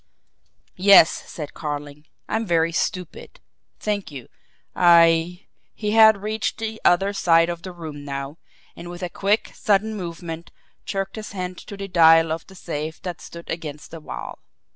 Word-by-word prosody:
"Yes," 195 -4 +8 0.2
said 150 -3 -7
Carling. 145 0 -6 0.2
"I - - -2
am 225 -1 -3
very 165 -1 +2
stupid. 180 +1 -4 0.4
Thank 205 -2 -2
you. 135 -5 -10 0.5
I 170 +1 +4
" - - -45
he 210 -1 -2
had 220 -2 +6
reached 215 0 -2
the 220 0 -5
other 195 +3 +3
side 165 -3 +3
of 170 -1 -4
the 185 - -7
room 160 -4 -8
now 140 +2 -6 0.4
and 175 - -9
with 175 +1 -8
a 180 - -2
quick, 205 +5 0
sudden 215 +1 +1
movement 170 -3 -7 0.4
jerked 195 +2 -3
his 215 -2 -7
hand 180 -2 -5
to 200 - -10
the 195 0 -5
dial 165 -2 +5
of 160 0 -4
the 190 - -15
safe 160 -3 -5
that 180 -3 -5
stood 170 0 -11
against 155 -3 -6
the 165 - -8
wall. 150 - -8
175 Hz, 165 wpm, -23 LUFS, 160-195 Hz, 0.5 s, Yes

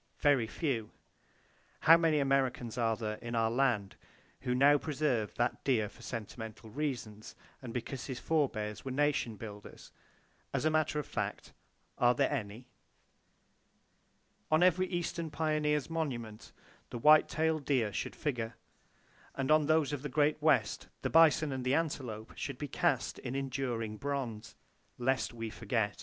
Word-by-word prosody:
Very 140 -6 +3
few! 115 -2 -2 0.9
How 165 - +8
many 165 -2 +3
Americans 135 -4 +1
are 115 -2 +1
there 110 -1 -4
in 120 0 -5
our 115 -1 +2
land 120 -6 +1 0.4
who 125 -1 -1
now 145 +3 +6
preserve 135 -9 -1
that 120 0 -1
deer 110 -6 +1
for 115 - -18
sentimental 115 -1 -7
reasons, 120 -7 -4 0.3
and 125 -3 -7
because 125 +2 -5
his 130 -3 -4
forbears 110 -10 -1
were 135 - -5
nation 135 -4 0
builders? 105 -1 -10 0.6
As - - 0
a 155 - +3
matter 155 -1 +1
of 150 - -2
fact, - - -4 0.5
are 120 0 +4
there 140 +3 +2
any? 115 -3 -4 1.8
On 155 +3 +4
every 185 +1 +4
eastern 170 -2 -3
pioneer's 150 -1 0
monument, 125 -10 -4 0.4
the 120 - -5
white 150 +5 +6
tailed 160 -1 0
deer 120 -8 +1
should - - -3
figure; 120 -6 -3 0.8
and 135 +1 -1
on 155 -1 +5
those 155 -2 +3
of 145 - -3
the 150 - -4
Great 150 +2 +2
West, 155 -3 +2 0.2
the - - -1
bison 160 -2 +5
and 130 -1 -3
the 130 +2 +2
antelope 130 -9 -3
should 140 -3 -5
be 145 - -4
cast - - 0
in 125 - -5
enduring 125 -5 -2
bronze, 120 -5 -4 0.4
"lest 130 +2 0
we 115 -2 -6
forget!" 110 -3 -1
130 Hz, 150 wpm, -32 LUFS, 115-150 Hz, 1.8 s, How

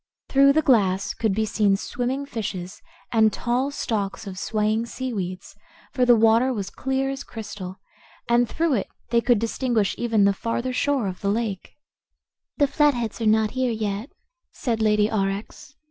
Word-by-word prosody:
Through 275 0 +5
the 315 +2 +2
glass 200 -8 +2
could 220 -4 0
be 220 +1 +1
seen 205 -2 +2
swimming 255 +6 -3
fishes, 200 -6 -5 0.3
and 220 -2 +4
tall 245 +5 -1
stalks 215 -9 -3
of 190 -2 -7
swaying 215 +2 0
seaweeds, 200 -9 -5 0.4
for 250 - +2
the 245 -1 +7
water 225 +3 +4
was 200 -6 -4
clear 265 0 -1
as 275 - -5
crystal 205 -4 -8 0.5
and 235 0 +3
through 330 -2 0
it 210 - 0 0.2
they 235 -1 +4
could 245 -1 +3
distinguish 230 -1 0
even 225 -3 +2
the 200 - +4
farther 235 +5 -2
shore 275 -2 +1
of 185 -2 -5
the 200 - 0
lake. 210 -3 -3 0.8
"The 290 - +4
Flatheads 270 -6 +1
are 225 - +1
not 215 0 +3
here 255 -1 0
yet," 215 +2 -3 0.4
said 230 -3 -2
Lady 210 -1 +3
Aurex. 215 +7 -3
225 Hz, 160 wpm, -24 LUFS, 205-255 Hz, 0.8 s, the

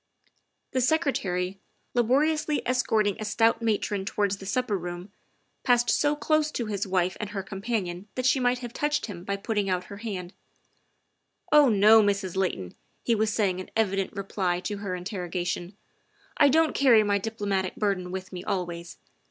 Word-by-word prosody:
The 260 - 0
Secretary, 195 - 0 0.3
laboriously 295 +6 +1
escorting 220 -5 +1
a - - -3
stout 225 +2 +2
matron 210 -3 0
towards 200 0 -1
the 195 - -9
supper 250 0 0
room, 175 +1 -6 0.5
passed 245 -1 +3
so 295 0 +2
close 310 0 +1
to 235 - -2
his 205 -2 -3
wife 185 -1 +1
and 210 - -4
her 195 -3 -4
companion 195 -2 -3
that 255 - -2
she 265 +1 +4
might 250 0 +2
have 240 - -8
touched 295 +2 0
him 180 -6 -8
by 200 +1 -2
put 200 +3 -4
ting 205 -2 0
out 180 -1 0
her - - -8
hand. 195 -4 -5 0.6
" 360 - -38
Oh, 295 -3 +7
no, 215 +1 +7
Mrs. 200 -3 0
Layton," 175 - -2 0.3
he 235 - +2
was 215 -1 +1
saying 195 -4 0
in 185 - -7
evident 195 -3 0
reply 190 -3 -1
to 205 +2 -4
her 200 -2 -4
interrogation, 180 0 -4 0.3
" - - -34
I 290 -2 +5
don't 320 +2 +3
carry 240 -6 +5
my 205 -1 +1
diplo 220 +1 -5
matic 190 -2 -1
burden 195 -4 -1
with 185 0 -6
me 180 0 -6
always. 175 -2 -4
205 Hz, 175 wpm, -27 LUFS, 185-240 Hz, 0.6 s, Oh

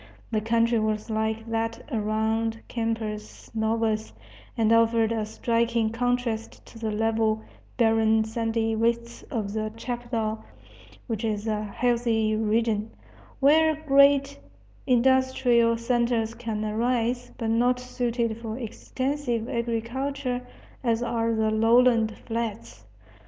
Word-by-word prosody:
The 215 - +1
country 230 +1 +2
was 215 +1 -1
like 220 0 -1
that 225 0 -2
around 220 0 0
Campos 225 -2 -4
Novos, 220 0 0 0.4
and 225 -1 +3
offered 230 0 +3
a 220 -2 -1
striking 230 0 0
contrast 245 -1 -2
to 225 - -13
the 225 -1 -2
level, 220 0 0 0.3
barren, 225 -2 +3
sandy 225 0 -1
wastes 235 +1 -1
of 205 -3 -3
the 215 0 -2
chapadao, 230 -3 -3 0.6
which 225 -2 -3
is 215 -1 -1
a 215 -1 -1
healthy 225 -1 +1
region, 220 0 0 0.5
where 315 +3 +5
great 280 - +4 0.5
industrial 250 -2 +3
centres 235 -1 0
can 225 -2 -4
arise, 235 +2 0
but 225 -2 -1
not 245 +2 +2
suited 240 -2 -2
for 225 -1 -5
extensive 255 0 -3
agriculture 245 +3 -2 0.4
as 235 -1 +1
are 230 -1 0
the 220 0 +1
lowland 225 0 +4
flats. 210 - -4
230 Hz, 115 wpm, -26 LUFS, 220-240 Hz, 0.6 s, where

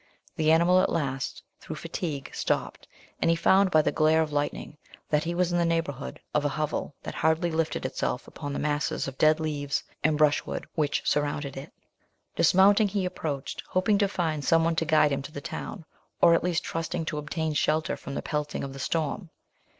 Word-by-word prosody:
The 155 0 +3
animal 175 +3 +5
at - - +1
last, 135 -5 -2 0.2
through - - -7
fatigue, 145 -6 -5
stopped, - - -2 0.3
and - - +3
he 165 - +4
found, 190 +4 +4
by 155 -3 +4
the - - +1
glare 160 +1 +3
of 155 - -6
lightning, 145 +1 -3 0.3
that 150 +1 +2
he 170 +1 -2
was 180 0 +1
in 175 - +1
the - - +3
neighbourhood 165 - -2
of 150 - +2
a 145 - +1
hovel 150 -1 -3
that - - -5
hardly 160 +2 +1
lifted 160 -4 -1
itself 130 -1 -2
up - - -14
from 145 -2 -4
the - - -3
masses 150 -1 -1
of 135 0 -8
dead 155 +1 +5
leaves 145 -2 -2 0.2
and 155 0 +3
brushwood 150 -1 +1
which 150 -3 0
surrounded 145 -1 -1
it. 135 +2 -8 0.6
Dismounting, 200 +5 +5
he 195 -1 -1
approached, 155 -6 -4
hoping 200 +2 +2
to 200 - +3
find 160 -6 -2
some 165 +2 +4
one 165 0 +1
to 165 - +1
guide 155 -1 +4
him 140 0 -1
to 145 - -9
the 145 - -6
town, 165 +4 -6 0.3
or 170 - +6
at 165 - +2
least 175 -2 0
trusting 165 0 -3
to 155 -1 -3
obtain 155 +1 -2
shelter 155 +2 +1
from 140 - -8
the - - -3
pelting 150 -1 -3
of 135 -1 -5
the 135 - -9
storm. 165 +5 -2
155 Hz, 205 wpm, -27 LUFS, 145-170 Hz, 0.6 s, or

